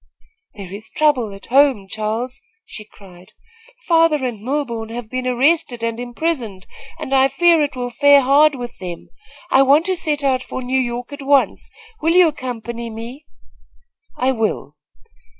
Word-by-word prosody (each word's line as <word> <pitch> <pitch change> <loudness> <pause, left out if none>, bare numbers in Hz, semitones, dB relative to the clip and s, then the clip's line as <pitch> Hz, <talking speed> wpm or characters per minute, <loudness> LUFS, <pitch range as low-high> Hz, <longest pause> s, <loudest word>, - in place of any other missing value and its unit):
"There 195 -3 -9
is 215 +2 -10
trouble 265 -8 +1
at 195 0 -12
home, 265 -6 +3
Charles," 220 +6 -4 0.2
she 215 - -10
cried. 185 -1 -17 0.5
"Father 330 -5 +3
and 240 -4 -4
Milborne 235 -2 -3
have 230 -1 -7
been 255 0 -3
arrested 255 -1 +1
and 230 0 -2
imprisoned 240 - -3 0.3
and 270 - -5
I 265 0 +5
fear 330 +4 +3
it 290 -2 -1
will 245 -1 -4
fare 285 +3 +5
hard 285 +3 +4
with 245 -2 -7
them. 175 -2 -8 0.4
I 265 - +6
want 285 +4 +4
to 375 0 0
set 300 -4 -2
out 265 -2 +1
for 260 - -6
New 260 +1 0
York 245 +2 -4
at 285 - -8
once. 275 0 +1 0.3
Will 330 +2 +2
you 360 -1 +7
accompany 235 -4 -6
me?" 235 +7 -9 0.9
"I 255 +1 +1
will." 225 -4 -2
255 Hz, 160 wpm, -19 LUFS, 230-285 Hz, 0.9 s, you